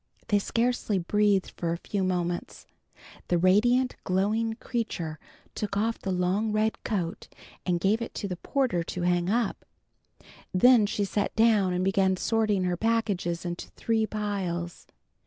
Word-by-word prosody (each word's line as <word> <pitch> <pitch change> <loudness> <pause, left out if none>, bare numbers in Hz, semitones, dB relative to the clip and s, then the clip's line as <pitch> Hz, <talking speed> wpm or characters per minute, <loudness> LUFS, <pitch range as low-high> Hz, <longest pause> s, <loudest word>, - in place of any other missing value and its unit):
They 205 - +4
scarcely 230 -1 0
breathed 200 +2 +1
for 170 -1 -1
a 170 - -1
few 195 +2 -3
moments. 175 -1 -2 0.6
The 175 - +2
radiant, 240 +8 +3
glowing 215 +5 +1
creature 180 -11 -4 0.3
took 200 -1 -3
off 225 +2 0
the 195 - -5
long 185 +4 0
red 215 +1 0
coat 180 -6 -3 0.4
and 175 -1 +1
gave 205 +6 +2
it 230 - -5
to 200 - -3
the 180 - -3
porter 255 -6 0
to 175 +1 -4
hang 175 0 +1
up, 230 0 0 0.9
then 220 +3 +5
she 205 0 -1
sat 205 +1 -2
down 220 -4 +4
and 180 +1 0
began 190 -1 +2
sorting 215 -2 +1
her 180 -1 0
packages 200 -6 0
into 175 0 -4
three 220 -1 0
piles. 190 -5 -3
200 Hz, 150 wpm, -27 LUFS, 180-220 Hz, 0.9 s, then